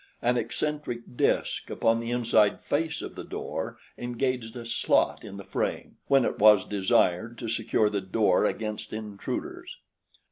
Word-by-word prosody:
An 120 +1 +2
eccentric 125 -3 -3
disk - - 0
upon 115 0 +2
the 115 0 -4
inside 115 -4 +3
face 160 +2 -1
of - - -6
the - - -7
door - - -5 0.2
engaged 120 -1 -2
a 120 -1 -7
slot 115 - +1
in 100 -2 -8
the 100 - -7
frame - - -3
when 135 -2 +4
it - - -2
was 105 -2 +7
desired 100 +2 +1
to 115 - -5
secure 110 -1 +1
the 105 -1 -1
door 95 0 +2
against 105 0 -3
intruders. 105 -2 -5
115 Hz, 150 wpm, -27 LUFS, 105-120 Hz, 0.2 s, was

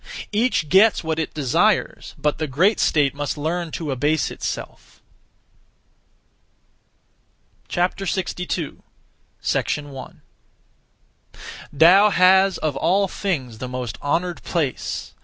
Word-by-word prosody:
Each 215 -6 +1
gets 195 +7 +4
what 160 0 -2
it 160 - -4
desires, 140 -5 0
but 150 0 -1
the 155 - -1
great 180 - +2
state 145 -3 +2
must 145 0 -4
learn 165 +3 -2
to 155 -4 -4
abase 145 +4 0
itself. - - -7 2.7
62. 180 -2 -2
1. 140 -3 -6 1.6
Tao 190 +7 +7
has 190 0 +4
of 155 -3 -2
all 195 +7 +2
things 135 - -3
the 130 - -5
most 125 -2 -5
honoured 170 +4 -1
place. 155 -7 -3
160 Hz, 100 wpm, -22 LUFS, 145-185 Hz, 2.7 s, Tao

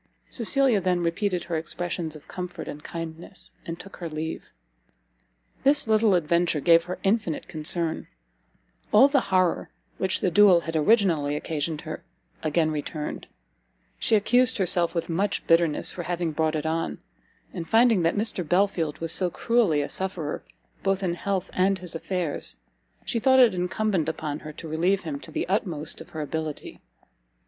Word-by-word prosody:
Cecilia 250 -2 +2
then 180 -1 +1
repeated 180 +1 0
her 170 -2 -2
expressions 165 0 -4
of 150 - -13
comfort 180 -1 -6
and 150 +1 -7
kindness, 165 +3 -6 0.2
and 165 0 -5
took 195 - -11
her 170 -2 -5
leave. 155 +1 -5 1.1
This 285 -2 +4
little 215 -2 +4
adventure 170 -1 +1
gave 165 +3 +5
her 180 +1 -5
infinite 195 -5 0
concern; 160 +1 -1 0.8
all 255 +6 +8
the 280 0 +3
horror 185 -2 +2 0.3
which 190 0 0
the 185 - +1
duel 185 -1 +6
had 165 -1 -5
originally 160 -5 +3
occasioned 155 +1 -3
her, 155 -2 -7 0.4
again 155 0 +1
returned; 150 0 -5 0.7
she 225 - +3
accused 250 +4 +3
herself 175 -3 +1
with 170 - -1
much 190 +5 -1
bitterness 165 -2 +3
for 175 - -5
having 175 -1 -2
brought 155 +1 0
it 155 0 -2
on; 160 +1 -1 0.6
and 170 -3 -6
finding 225 -3 +5
that 165 +4 +1
Mr 210 -3 -1
Belfield 175 -2 +1
was 165 -1 -3
so 180 +1 +2
cruelly 210 -7 +2
a - - -3
sufferer 185 -6 -3 0.4
both 195 0 0
in 180 - +1
his 175 - -5
health 195 -2 -2
and 190 +1 +2
his 180 -2 -6
affairs, 165 - -2 0.5
she 230 - -1
thought 260 +3 +5
it 240 -5 +6
incumbent 180 -1 0
upon 155 -2 -4
her 155 - -8
to 160 - -9
relieve 175 +5 +1
him 150 -4 -4
to - - -11
the - - -3
utmost 175 -7 -2
of 160 - -12
her 155 - -5
ability. 155 0 -5
175 Hz, 165 wpm, -26 LUFS, 160-195 Hz, 1.1 s, all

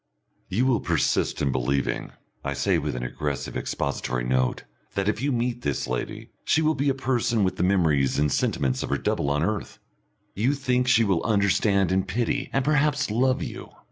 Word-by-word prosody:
"You 115 +7 +1
will 130 -4 +3
persist - - 0
in 70 - +2
believing," 65 +2 -1 0.3
I - - -2
say, 95 -4 +1
with 75 -3 -3
an 60 - -4
aggressive 70 +3 -4
expository 65 -3 -2
note, 65 0 0 0.3
"that 100 0 0
if 110 +2 0
you 140 +1 0
meet 120 0 -1
this 70 - -1
lady 60 -1 -4
she 160 - +2
will 155 +1 +3
be 140 -1 0
a 135 - +1
person 120 -4 +1
with 95 - 0
the - - -2
memories 80 -9 +2
and 75 0 +2
sentiments 65 -1 0
of - - -4
her - - +1
double 70 - -1
on 75 +2 +1
earth. 105 +2 -2 0.6
You 125 +8 +1
think 125 -2 0
she 115 -2 +5
will 95 -6 +1
understand 100 -3 +2
and 95 +1 +1
pity, 115 +5 -1
and 135 -1 0
perhaps 150 -3 +2
love 130 +3 +2
you. - - -7
100 Hz, 190 wpm, -25 LUFS, -, 0.6 s, she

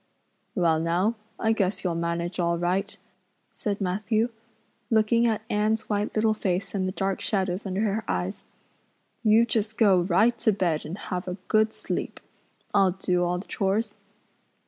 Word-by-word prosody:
"Well 165 -3 +3
now, 175 +7 +1 0.3
I 220 - +2
guess 195 -3 -1
you'll 180 -3 0
manage 170 +2 -2
all 170 -1 +1
right," 185 +4 -1 0.5
said 205 -1 -2
Matthew, 215 +4 0 0.6
looking 230 +1 +3
at 220 -1 0
Anne's 215 +1 0
white 205 0 -1
little 215 0 +3
face 190 -3 -2
and 190 -2 0
the - - -1
dark 195 0 -2
shadows 190 -1 -1
under 190 +2 -1
her 220 0 0
eyes. 90 +1 -2 0.8
"You 220 +1 +5
just 220 -1 -1
go 195 -6 +5
right 200 +7 +3
to 220 - +3
bed 175 -6 0
and 165 +5 -5
have 180 -2 -4
a 180 +1 -3
good 215 0 +3
sleep. - - -4 0.5
I'll 195 -3 +4
do 180 -1 0
all 175 0 0
the 185 - -7
chores." 210 +2 -1
195 Hz, 160 wpm, -26 LUFS, 180-215 Hz, 0.8 s, You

